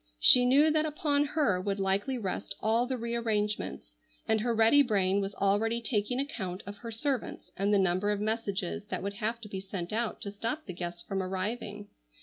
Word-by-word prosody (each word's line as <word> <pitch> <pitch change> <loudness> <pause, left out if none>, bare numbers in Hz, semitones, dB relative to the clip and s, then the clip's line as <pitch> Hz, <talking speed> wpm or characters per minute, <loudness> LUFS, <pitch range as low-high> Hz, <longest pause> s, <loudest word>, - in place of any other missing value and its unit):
She 245 - +7
knew 290 +5 +5
that 310 0 +2
upon 295 -1 +1
her 285 - +1
would 200 +1 -2
likely 195 +7 0
rest 200 -2 -4
all 230 +3 +2
the 260 0 -2
re 235 0 -4
arrangements, 210 - -2 0.3
and 220 -1 +2
her 240 +2 0
ready 225 +5 +6
brain 200 -6 +2
was 195 0 -4
already 210 +4 +1
taking 230 +1 -1
account 190 -10 -4
of 200 +1 -8
her 230 +2 -8
servants 255 +3 -3
and 200 +2 0
the 205 - +5
number 190 +1 +2
of 205 -1 0
messages 210 -2 -2
that - - -3
would 200 0 -3
have 220 +3 -2
to 215 - -8
be 195 -2 -5
sent 190 -1 -5
out 230 0 -1
to 200 - -4
stop 230 +9 -4
the 185 - -6
guests 175 0 -6
from 195 -1 -2
arriving. 205 +2 -4
210 Hz, 200 wpm, -30 LUFS, 195-235 Hz, 0.3 s, She